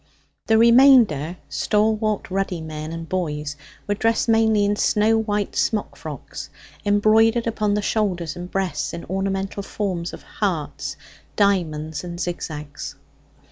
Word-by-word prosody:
The 220 - +5
remainder, 230 - +6
stalwart 215 -1 0
ruddy 190 -2 -1
men 155 0 -6
and 165 0 -6
boys, 150 -5 -2 0.3
were 205 - 0
dressed 225 +3 +1
mainly 220 -2 +4
in 205 +1 +1
snow 215 +2 +3
white 205 -8 -1
smock 145 +10 0
frocks, - - -8 0.3
embroidered 220 +3 +4
upon 215 -3 0
the 210 - -1
shoulders 180 -8 -1
and 175 0 -7
breasts, 190 -4 -2
in 170 - -6
ornamental 195 +1 -2
forms 185 -4 -3
of - - -10
hearts, - - -3 0.4
diamonds, 160 -7 0
and 175 -1 -6
zigzags. 155 -5 -5
195 Hz, 130 wpm, -22 LUFS, 170-215 Hz, 0.4 s, remainder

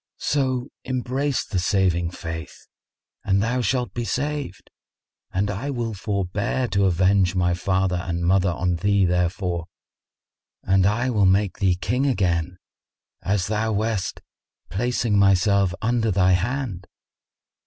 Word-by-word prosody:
So 130 -3 -1
embrace 130 +2 -1
the 95 - -2
Saving 90 -3 +1
Faith 80 -1 -7 0.6
and 100 0 +2
thou 115 +4 0
shalt 120 -2 -1
be 120 - -3
saved, 140 -1 -3 0.6
and 100 +2 0
I 110 +9 -4
will 120 -4 -2
forbear 100 +4 -2
to 100 -1 +2
avenge 95 +1 +3
my 90 -1 +2
father 95 0 0
and 85 0 -3
mother 95 +1 +3
on 90 0 -1
thee 100 +1 +2
therefor, 90 -1 -1 1.0
and 95 0 +3
I 120 +5 0
will 105 -4 +3
make 95 +1 +2
thee 95 -2 +3
King 125 +9 0
again 90 - 0 0.6
as 95 -1 0
thou 110 +2 -1
wast, 105 -2 -2 0.5
placing 115 0 0
myself 100 0 +3
under 115 0 +1
thy 95 -2 +3
hand." 100 0 -1
100 Hz, 130 wpm, -23 LUFS, 90-120 Hz, 1.0 s, avenge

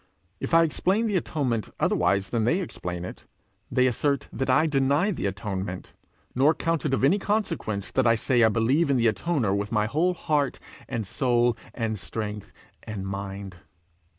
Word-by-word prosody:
If - - 0
I 165 - +7
explain 190 +7 +1
the 210 -3 0
atonement 130 - -1
otherwise 100 +1 +1
than 115 -2 0
they 165 - +2
explain 90 - -5
it, - - -10 0.4
they 130 0 +3
assert 140 +3 0
that 135 - -2
I 145 +5 +4
deny 145 +6 +2
the 145 - -2
atonement; 95 -1 -5 0.4
nor 145 +5 +4
count 165 -2 -1
it 135 - -1
of - - -3
any 170 +10 +4
consequence 165 - -2
that 130 -2 +2
I 115 - +5
say 120 +1 +2
I 110 - +6
believe 130 +9 +2
in 135 - +3
the 120 - +2
atoner 110 - +1
with 100 0 -2
my 105 0 +2
whole 165 +10 +1
heart, 150 -5 0 0.3
and 115 -2 -2
soul, 120 +2 +2 0.2
and 110 -3 -2
strength, 105 0 -5 0.3
and 105 -3 -6
mind. 100 -1 -6
120 Hz, 175 wpm, -26 LUFS, 105-150 Hz, 0.4 s, I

